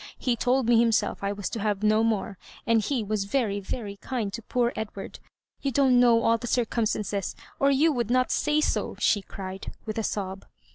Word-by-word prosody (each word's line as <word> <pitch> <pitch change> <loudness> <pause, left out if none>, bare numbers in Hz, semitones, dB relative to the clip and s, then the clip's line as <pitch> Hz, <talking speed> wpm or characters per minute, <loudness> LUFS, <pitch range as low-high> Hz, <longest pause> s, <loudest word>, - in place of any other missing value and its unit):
He 250 -2 0
told 250 +2 +1
me 235 -1 +5
himself 225 -3 +1
I 200 - 0
was 205 -1 -4
to 230 - -3
have 210 -1 -1
no 215 +1 +4
more; 215 -3 -1 0.3
and 230 -1 +3
he 240 +2 -1
was 205 -1 -2
veiy, 205 -5 0
very 200 -1 -5
kind 220 -3 -3
to 230 - -5
poor 240 +2 0
Edward. 210 -2 -6 0.4
Tou 275 - 0
don't 265 -1 +4
know 235 -2 +5
all 230 0 +3
the 240 - -5
circam 235 -1 +1
stances, 200 -2 -2 0.2
or 275 - +4
you 290 +4 +4
would 240 -5 -1
not 255 +1 +2
say 300 0 +2
so," - - -1
she 205 - +2
cried, 190 0 -7
with 215 0 -3
a - - -1
sob. 195 -2 -4
225 Hz, 205 wpm, -26 LUFS, 205-245 Hz, 0.4 s, me